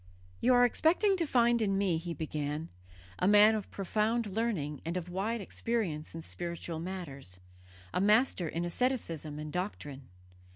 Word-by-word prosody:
"'You 250 +1 +4
are 245 0 +6
expecting 355 - +3
to 335 -3 0
find 240 -3 +3
in 195 -2 +1
me,' 190 -4 +2
he 170 0 -5
began, 150 0 -3 0.5
'a 180 - +2
man 210 +2 +7
of 215 -2 -3
profound 215 +4 0
learning 195 -9 -2
and 170 +3 -2
of 180 -1 -5
wide 205 +5 -2
experience 190 -8 -3
in 165 - -5
spiritual 170 -1 -5
matters, 145 - -6 0.5
a - - +1
master 210 -3 +3
in 165 +2 -2
asceticism 170 - -2
and 150 0 -6
doctrine. 145 - -5
185 Hz, 155 wpm, -31 LUFS, 160-225 Hz, 0.5 s, man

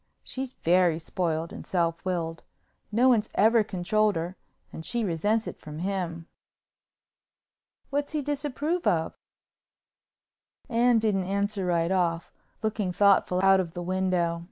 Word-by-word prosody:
She's 260 0 -5
very 175 -1 +3
spoiled 165 -1 -2
and - - -8
self 170 -2 -1
willed. 165 -3 -2 0.5
No 240 +4 +4
one's 225 -4 +3
ever 220 +2 +5
controlled 210 +3 +1
her 170 +3 -3 0.4
and 160 - -7
she 235 +7 -1
resents 205 +6 0
it - - -7
from 150 0 -9
him." 175 -2 -3 1.6
"What's 285 +2 -2
he 300 -2 -1
disapprove 295 +4 -2
of?" 160 -2 +1 1.5
Anne 240 0 +3
didn't 210 -4 +1
answer 200 -1 -1
right 170 0 +1
off, 170 -3 0 0.3
looking 210 -3 -1
thoughtful 190 -1 +3
out 195 0 +6
of 170 -3 -3
the 175 - -4
window. 180 -2 0
190 Hz, 130 wpm, -27 LUFS, 170-220 Hz, 1.6 s, out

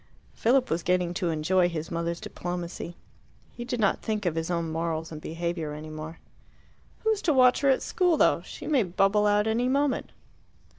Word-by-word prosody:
Philip 255 +3 +2
was 165 - +1
getting 180 0 +1
to 175 -1 -1
enjoy 175 +3 +2
his 165 -2 -5
mother's 170 0 -2
diplomacy. 175 -1 -5 0.5
He 240 - -7
did 245 0 -3
not 200 -3 +2
think 215 -3 -2
of 175 - +1
his 165 +1 -3
own 170 -2 -1
morals 165 0 -2
and 155 -1 -7
behaviour 165 -2 -3
any 155 +1 -8
more. 155 +1 -7 0.9
"Who's 440 -2 +1
to 315 - +2
watch 255 -2 +5
her 280 - +3
at 265 - +3
school, 355 -3 +2
though? - - +3
She - - -9
may 285 -5 +3
bubble 195 +2 +2
out 205 0 +3
any 235 +3 +1
moment." 280 +1 0
180 Hz, 185 wpm, -27 LUFS, 165-240 Hz, 0.9 s, watch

